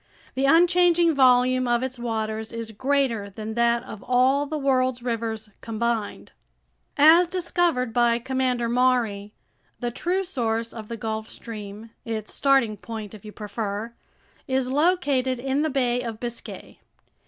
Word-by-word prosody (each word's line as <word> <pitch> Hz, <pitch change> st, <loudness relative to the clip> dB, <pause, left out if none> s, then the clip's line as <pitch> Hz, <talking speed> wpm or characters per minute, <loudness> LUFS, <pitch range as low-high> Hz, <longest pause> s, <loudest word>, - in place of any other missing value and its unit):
The 265 Hz, +1 st, 0 dB
unchanging 345 Hz, +1 st, +4 dB
volume 255 Hz, -1 st, +4 dB
of 240 Hz, +1 st, +1 dB
its 260 Hz, -1 st, -4 dB
waters 220 Hz, -2 st, -3 dB
is 230 Hz, -1 st, -6 dB
greater 255 Hz, -3 st, 0 dB
than 215 Hz, +2 st, -6 dB
that 235 Hz, +1 st, +2 dB
of 215 Hz, -5 st, -9 dB
all 260 Hz, +3 st, +2 dB
the 310 Hz, +1 st, -3 dB
world's 255 Hz, -3 st, +1 dB
rivers 225 Hz, -3 st, -3 dB
combined. 230 Hz, -1 st, -3 dB, 0.7 s
As 320 Hz, +5 st, +7 dB
discovered 345 Hz, -8 st, 0 dB
by 240 Hz, -1 st, +3 dB
Commander 255 Hz, -1 st, -1 dB
Maury, 235 Hz, -4 st, +1 dB, 0.4 s
the 240 Hz, -1 st, -2 dB
true 360 Hz, +9 st, -1 dB
source 230 Hz, -9 st, -2 dB
of 220 Hz, -2 st, -8 dB
the 230 Hz, -, -6 dB
Gulf 220 Hz, 0 st, -4 dB
Stream, 215 Hz, -1 st, -9 dB
its 220 Hz, -2 st, -5 dB
starting 270 Hz, -6 st, +2 dB
point, 220 Hz, 0 st, -7 dB
if 210 Hz, -, -12 dB
you 210 Hz, -, -9 dB
prefer, 210 Hz, +1 st, -5 dB, 0.5 s
is 260 Hz, -1 st, 0 dB
located 280 Hz, -5 st, +1 dB
in 270 Hz, +3 st, -1 dB
the 315 Hz, -, +1 dB
Bay 250 Hz, -3 st, 0 dB
of 230 Hz, -3 st, -6 dB
Biscay. 240 Hz, -1 st, -7 dB
240 Hz, 140 wpm, -24 LUFS, 225-270 Hz, 0.7 s, As